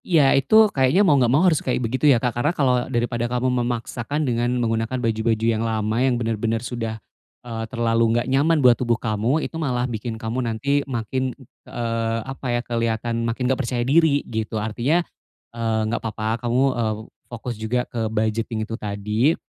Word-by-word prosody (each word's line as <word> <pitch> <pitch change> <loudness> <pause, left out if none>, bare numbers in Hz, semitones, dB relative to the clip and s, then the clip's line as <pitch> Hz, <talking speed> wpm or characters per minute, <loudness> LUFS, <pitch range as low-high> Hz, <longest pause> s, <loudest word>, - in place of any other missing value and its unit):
Ya 155 -7 +4
itu 220 +11 +5
kayaknya 135 +10 +3
mau 155 - +5
nggak 130 -4 +3
mau 145 +9 +4
harus 165 -5 +3
kayak 130 - -1
begitu 130 +6 +2
ya 130 - +6
Kak, 120 +1 -1
karena 120 +5 0
kalau 130 -3 +3
daripada 120 -1 -1
kamu 125 0 0
memaksakan 120 +4 -2
dengan 120 -1 0
menggunakan 115 +1 -1
baju-baju 115 -1 0
yang 115 -1 +1
lama, 110 -1 -1
yang 130 -2 +2
benar-benar 115 0 -1
sudah, 115 -2 -4 0.5
eee, 115 -2 -4
terlalu 115 -1 +1
nggak 120 - 0
nyaman 140 +3 +2
buat 125 - +8
tubuh 120 -2 +1
kamu, 115 +8 0
itu 165 - -5
malah 125 -4 0
bikin 115 -1 -4
kamu 115 +3 -3
nanti 135 +5 0
makin, 130 +2 -2
ng 130 - -16 0.2
eee, 115 -1 -2
apa 135 0 -8
ya, 120 0 +1
keliatan 115 0 -1
makin 120 +2 -2
nggak 130 +2 +1
percaya 120 -2 -2
diri 145 +1 +3
gitu, 110 -1 -3
artinya, 120 +11 0 0.5
eee, 115 -1 -1
nggak 110 +2 -2
apa-apa 110 +2 -3
kamu, 125 +2 +2 0.2
eee, 110 -1 0 0.3
fokus 120 0 -5
juga 125 +3 0
ke 115 -2 -3
budgeting 110 0 -1
itu 115 - -7
tadi. 105 +8 0
120 Hz, 180 wpm, -22 LUFS, 115-130 Hz, 0.5 s, buat